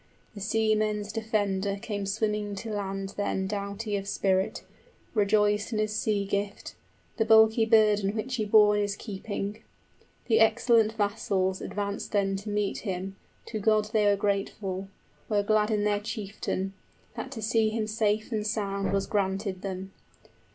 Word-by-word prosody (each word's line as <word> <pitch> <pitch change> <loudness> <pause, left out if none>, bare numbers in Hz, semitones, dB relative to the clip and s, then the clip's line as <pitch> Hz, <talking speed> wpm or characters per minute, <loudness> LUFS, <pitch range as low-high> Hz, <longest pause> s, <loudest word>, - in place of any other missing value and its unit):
The 205 - -9
seamen's 215 -1 +1
defender 205 -3 0
came 205 -2 -4
swimming 210 0 -1
to 220 +3 -6
land 195 -1 -3
then 200 -1 -1
65 - - -2
Doughty 205 +1 -3
of 195 0 -5
spirit, 190 -1 0 0.5
rejoiced 210 0 +2
in - - 0
his 215 0 0
sea 210 -2 0
gift, 200 +1 -3 0.4
The 220 - +3
bulky 220 0 +6
burden 210 -2 +4
which 255 +4 -2
he 215 - 0
bore 210 0 +6
in 205 - +2
his 205 -1 -1
keeping. 200 0 -5 0.6
The 225 -2 +3
excellent 225 0 +4
vassals 200 -3 0
advanced 200 +1 -4
then 195 -1 +2
to 205 +2 -7
meet 205 -1 -1
him, 190 -1 -4 0.3
To 220 - -3
God 215 0 +2
they 210 -2 +3
were 205 - +5
grateful, 195 -1 -2 0.4
were 205 -2 +2
glad 215 +1 +2
in 210 -2 +1
their 205 0 +2
chieftain, 205 -2 -4 0.4
That - - -5
to 225 - -6
see 220 0 +2
him 220 0 -1
safe 215 +1 0
and 215 -2 -1
sound 200 -2 -1
was 195 0 +1
granted 195 -1 -1
them. 190 0 -5
210 Hz, 160 wpm, -28 LUFS, 200-215 Hz, 0.6 s, bulky